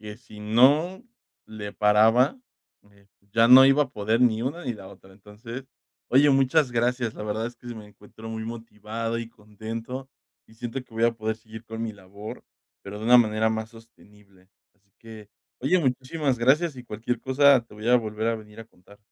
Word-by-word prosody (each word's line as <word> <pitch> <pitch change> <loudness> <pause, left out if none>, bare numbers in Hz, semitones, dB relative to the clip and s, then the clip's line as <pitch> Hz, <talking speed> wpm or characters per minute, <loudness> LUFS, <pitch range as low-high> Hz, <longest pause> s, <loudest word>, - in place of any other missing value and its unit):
que 105 0 -9
si 110 -3 -16
no 140 - +3 0.4
le 105 -2 -8
paraba, 110 - +3 0.5
eh, 100 0 -25 0.3
ya 115 +1 +4
no 130 +2 +10
iba 140 +2 +4
a 130 - -14
poder 110 +1 -1
ni 115 -3 +3
una 155 +7 -4
ni 125 - -2
la 100 -3 -12
otra, 95 0 -16
entonces 110 +6 -10 0.4
oye, 140 +3 +5
muchas 135 +1 +3
gracias, 120 -1 0
la - - -8
verdad 105 +2 -2
es 120 0 -9
que 120 - -17
sí 120 - -6
me 110 -2 -11
encuentro 105 +2 -13
muy 110 0 -5
motivado 115 0 -5
y 115 -1 -6
contento, 115 +4 -8 0.4
y 110 - -20
siento 120 +3 -5
que 115 - -20
voy 115 +1 +1
a 115 - +3
poder 110 -1 -3
seguir 110 0 -12
con 110 0 -6
mi 115 -1 -4
labor, 100 +1 -11 0.4
pero 100 +1 -8
de 110 - -7
una 125 +1 +8
manera 110 -1 +2
más 110 0 -4
sostenible. 105 -4 -20 0.3
Así 100 -1 -40
que 110 -2 -12 0.3
oye, 140 +9 +2
muchísimas 135 0 -1
gracias 140 +6 +2
y 125 - -10
cualquier 115 +2 -4
cosa 135 +1 +4
te 115 - -17
voy 105 +2 -5
a 125 - +6
volver 110 -1 -2
a 115 - 0
venir 105 0 -13
a - - -9
contar. 100 -1 -21
115 Hz, 200 wpm, -25 LUFS, 105-125 Hz, 0.5 s, no